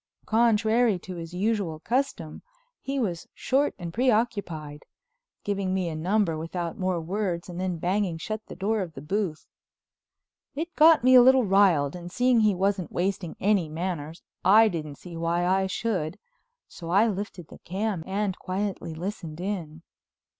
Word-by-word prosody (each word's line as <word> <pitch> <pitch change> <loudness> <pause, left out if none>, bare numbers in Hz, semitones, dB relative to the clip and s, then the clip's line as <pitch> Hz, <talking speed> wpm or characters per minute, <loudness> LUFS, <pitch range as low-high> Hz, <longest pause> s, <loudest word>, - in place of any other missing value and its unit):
Contrary 225 -1 +3
to 185 +1 -8
his 165 0 -7
usual 190 -4 -1
custom 220 - -2 0.4
he 275 0 -2
was 180 -9 -2
short 275 +3 +1
and 170 -3 -6
preoccupied, 200 - 0 0.6
giving 195 -2 -1
me 185 -3 -1
a 160 - -5
number 180 +1 +1
without 165 +1 -4
more 185 -2 -1
words 175 0 -2
and 175 -1 -7
then 185 -2 -2
banging 180 0 0
shut 215 +6 -5
the - - -9
door 205 +3 0
of 175 -4 -5
the 135 - -7
booth. 185 -1 -2 1.1
It 330 +4 -4
got 315 -4 +6
me 255 +1 +6
a 250 - +10
little 260 +1 +6
riled 185 -8 +3
and 175 0 -8
seeing 250 +1 +3
he 215 -3 +3
wasn't 195 -1 0
wasting 180 -2 -2
any 195 -5 +2
manners 165 -1 -4 0.2
I 215 +4 +6
didn't 155 -5 -5
see 175 +3 -11
why 170 +1 0
I 190 +1 +2
should, 185 -5 -2 0.5
so 165 -2 -9
I 200 +5 +5
lifted 195 -5 -5
the - - -13
cam 195 -1 -3
and 195 0 -1
quietly 185 -3 -3
listened 170 -2 -6
in. 170 -5 -4
190 Hz, 160 wpm, -26 LUFS, 170-215 Hz, 1.1 s, a